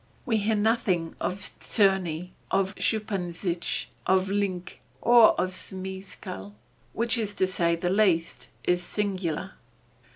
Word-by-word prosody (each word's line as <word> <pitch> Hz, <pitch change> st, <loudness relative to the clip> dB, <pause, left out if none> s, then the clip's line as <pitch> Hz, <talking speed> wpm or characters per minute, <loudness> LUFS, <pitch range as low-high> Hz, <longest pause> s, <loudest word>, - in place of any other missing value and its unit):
We 230 Hz, -4 st, +2 dB
hear 215 Hz, +1 st, +1 dB
nothing 205 Hz, -6 st, +1 dB
of 185 Hz, -, -1 dB, 0.2 s
Czerny, 185 Hz, -5 st, +2 dB, 0.2 s
of 195 Hz, 0 st, +1 dB
Schuppanzich, 180 Hz, -5 st, -1 dB, 0.2 s
of 190 Hz, +1 st, +3 dB
Linke, 190 Hz, -3 st, -2 dB, 0.2 s
or 235 Hz, -2 st, +6 dB
of 185 Hz, +1 st, 0 dB
Zmeskall, 185 Hz, -, -7 dB, 0.4 s
which 235 Hz, +2 st, +1 dB, 0.2 s
to 190 Hz, -, +3 dB
say 170 Hz, -2 st, +1 dB
the 175 Hz, +1 st, -1 dB
least, 185 Hz, -5 st, +1 dB
is 180 Hz, 0 st, +2 dB
singular. 190 Hz, -2 st, -2 dB
190 Hz, 110 wpm, -27 LUFS, 175-205 Hz, 0.4 s, or